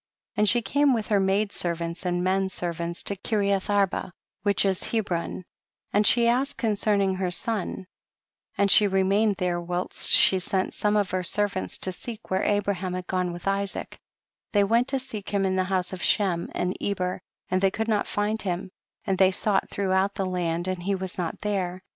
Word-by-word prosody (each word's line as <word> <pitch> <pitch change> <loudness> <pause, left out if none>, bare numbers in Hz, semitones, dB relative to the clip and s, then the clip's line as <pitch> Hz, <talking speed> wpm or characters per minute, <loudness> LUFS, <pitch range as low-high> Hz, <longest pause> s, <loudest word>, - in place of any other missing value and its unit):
85. - - -35
And 210 - +5
she 240 - +3
came 285 +6 +3
with 220 -2 -3
her 205 -2 +3
maid 195 +2 +1
servants 170 0 -3
and 175 0 0
men 190 +1 +1
servants 170 -1 -4
to 200 - -2
Kireath 200 -1 -1
Arba, 200 -2 +1 0.3
which 200 0 +2
is 190 -2 0
Hebron, 185 -5 -2 0.5
and 210 0 +4
she 235 -2 +5
asked 265 +4 +1
concerning 205 -3 +1
her 185 -1 -1
son, 195 0 -3 0.7
and 200 -1 +3
she 210 - +7
remained 195 +2 +2
there 180 -1 -1
whilst 175 +1 +1
she 190 - +6
sent 185 +1 -1
some 210 0 0
of 205 -2 0
her 185 - 0
servants 200 +1 -1
to 185 - -2
seek 225 +3 -9
where 190 +1 +1
Abra 205 -1 +1
ham 185 -1 -4
had 185 -1 -5
gone 180 -1 -1
with 175 +2 -8
Isaac; 195 0 -2 0.5
they 205 -1 +4
went 230 +5 +2
to 270 - 0
seek 245 -6 -6
him 200 -1 0
in 190 0 0
the 185 0 +1
house 185 -1 -1
of 185 - -6
Shem 180 -5 +1
and 180 +1 -1
Eber, 185 -2 -2 0.3
and 185 0 +1
they 195 - +4
could 220 +3 -3
not 215 -2 +1
find 210 +2 -1
him, 185 -1 -3 0.3
and 190 -3 -1
they 190 -1 +6
sought 195 +1 0
throughout 195 0 0
the 195 - -1
land 175 -1 -2
and 185 -1 -2
he 195 +2 0
was 190 -1 -4
not 170 -2 -3
there. 185 -3 -2
195 Hz, 195 wpm, -26 LUFS, 185-205 Hz, 0.7 s, she